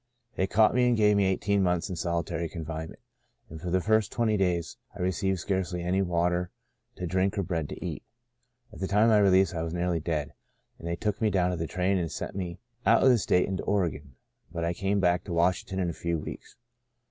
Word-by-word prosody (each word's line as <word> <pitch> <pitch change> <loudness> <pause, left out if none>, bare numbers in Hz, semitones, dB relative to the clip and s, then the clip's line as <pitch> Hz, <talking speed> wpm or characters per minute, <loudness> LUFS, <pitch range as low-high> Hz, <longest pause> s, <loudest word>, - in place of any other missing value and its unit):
They 95 - 0
caught 105 +3 +4
me 125 0 +3
and 120 -1 +3
gave 105 -1 +4
me 100 -1 +3
eighteen 100 +1 +1
months 90 -2 +1
in 90 - -4
solitary 85 -1 -2
confinement, 80 -1 -6 0.5
and 80 -1 -8
for 90 - -4
the 95 +2 +2
first 110 +2 +2
twenty 115 -3 +1
days 90 -4 0 0.2
I - - -11
received 95 +1 0
scarcely 90 -1 -2
any 90 +2 +1
water 90 0 0 0.5
to 90 - -5
drink 95 +3 0
or 100 - +1
bread 85 -5 -2
to - - -7
eat. - - -4 0.7
At - - -11
the 95 - -2
time 105 +3 +3
of 115 - +5
my 105 - +6
release 95 -1 +4
I 80 - -2
was 80 +1 -3
nearly 90 -1 0
dead, 75 -3 -3 0.5
and 85 - -7
they 85 - -1
took 105 +4 -2
me 110 - +3
down 90 -3 +1
to - - -1
the 80 0 -3
train 95 +3 0
and 85 -3 -2
sent - - -5
me 90 -3 -4 0.3
out 115 +1 +4
of 130 - +7
the 125 -2 +5
state 90 -2 +2
into 95 -2 -2
Oregon; 80 -9 -2 0.4
but 85 -1 -3
I 85 - 0
came 100 +3 0
back 90 -2 +2
to 90 - -5
Washington 90 +2 +1
in 90 -2 0
a - - -8
few 85 +1 -2
weeks. 75 - -8
90 Hz, 230 wpm, -28 LUFS, 85-100 Hz, 0.7 s, of